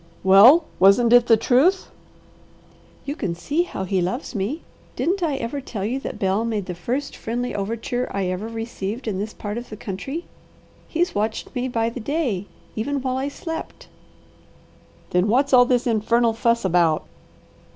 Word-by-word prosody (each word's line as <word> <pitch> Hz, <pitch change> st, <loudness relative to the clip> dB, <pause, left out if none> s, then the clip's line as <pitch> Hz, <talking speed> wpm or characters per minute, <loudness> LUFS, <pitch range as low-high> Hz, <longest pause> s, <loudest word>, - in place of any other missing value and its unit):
"Well 215 Hz, -, +8 dB, 0.2 s
wasn't 225 Hz, +5 st, +5 dB
it 245 Hz, 0 st, +6 dB
the 225 Hz, -, +6 dB
truth?" 280 Hz, -, +2 dB, 1.1 s
"You 285 Hz, -, -3 dB
can 180 Hz, -, -3 dB
see 290 Hz, -, -1 dB
how 350 Hz, -, -4 dB
he 190 Hz, 0 st, 0 dB
loves 190 Hz, -, -3 dB
me. 220 Hz, -, -3 dB, 0.3 s
Didn't 375 Hz, +3 st, 0 dB
I 315 Hz, -5 st, 0 dB
ever 270 Hz, +2 st, -4 dB
tell 210 Hz, -6 st, -5 dB
you 250 Hz, +5 st, -1 dB
that -, -, -6 dB
Bel 195 Hz, +3 st, 0 dB
made 220 Hz, -4 st, -2 dB
the 180 Hz, -, -5 dB
first 245 Hz, +11 st, -3 dB
friendly 245 Hz, +2 st, -3 dB
overture 230 Hz, +4 st, -3 dB
I 200 Hz, -1 st, -1 dB
ever 185 Hz, +4 st, -3 dB
received 225 Hz, 0 st, -5 dB
in 195 Hz, -3 st, -2 dB
this 210 Hz, +2 st, -3 dB
part 210 Hz, +2 st, -4 dB
of 240 Hz, -, -11 dB
the 215 Hz, -, -8 dB
country? 240 Hz, -, -5 dB, 0.6 s
He's 345 Hz, +2 st, 0 dB
watched 215 Hz, +2 st, -2 dB
me 250 Hz, -1 st, -2 dB
by 230 Hz, -2 st, -1 dB
the 245 Hz, -, -7 dB
day, 240 Hz, -, -2 dB, 0.3 s
even 275 Hz, +5 st, -2 dB
while 260 Hz, -1 st, -1 dB
I 270 Hz, +1 st, -1 dB
slept." 325 Hz, +3 st, -7 dB, 1.2 s
"Then 180 Hz, +3 st, +2 dB
what's 265 Hz, +5 st, +2 dB
all 245 Hz, -1 st, +8 dB
this 245 Hz, -1 st, +1 dB
infernal 230 Hz, 0 st, +2 dB
fuss 235 Hz, -1 st, +1 dB
about?" 170 Hz, -4 st, +2 dB
230 Hz, 170 wpm, -22 LUFS, 200-265 Hz, 1.2 s, Well